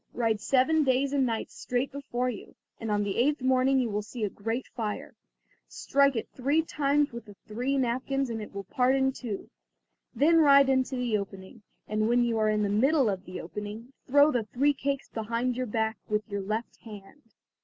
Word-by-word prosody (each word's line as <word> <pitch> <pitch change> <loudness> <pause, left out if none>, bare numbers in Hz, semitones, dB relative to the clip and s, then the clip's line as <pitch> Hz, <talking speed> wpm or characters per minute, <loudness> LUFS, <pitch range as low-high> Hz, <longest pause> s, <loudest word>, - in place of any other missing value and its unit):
Ride 225 -3 0
seven 290 +6 +3
days 270 +1 +1
and 270 -2 +2
nights 225 -1 -3
straight 250 +2 -2
before 260 -3 -3
you, 210 - -10 0.2
and 225 - -4
on 205 0 +1
the 200 -1 -3
eighth 285 +5 +2
morning 260 +1 +3
you 250 - +1
will 205 +1 -1
see 215 +2 -7
a 205 - -1
great 225 +5 -3
fire. 215 -3 -5 0.5
Strike 280 -1 +2
it 225 - -3
three 285 +5 +1
times 290 -2 +1
with 235 -1 -8
the 205 -2 -13
three 250 +6 -2
napkins 260 +1 -1
and 225 -1 -4
it 210 - -8
will 200 0 -6
part 250 +6 +1
in 265 0 +2
two. 235 -6 -6 0.7
Then 325 +4 +4
ride 280 -3 +6
into 260 0 +1
the 240 -4 0
opening, 195 +2 -9 0.3
and 215 +1 0
when 240 0 +3
you 230 -2 0
are 215 0 +2
in 210 0 +1
the - - +1
middle 260 +5 +3
of 190 0 -5
the 185 - -7
opening, 210 +8 -7
throw 285 +3 +5
the 240 -5 -1
three 280 +7 +1
cakes 275 0 -3
behind 230 +3 -2
your 255 0 -2
back 220 0 -1
with 210 0 -1
your 200 -2 -3
left 215 +4 -4
hand." 210 +5 -12
245 Hz, 200 wpm, -28 LUFS, 215-270 Hz, 0.7 s, ride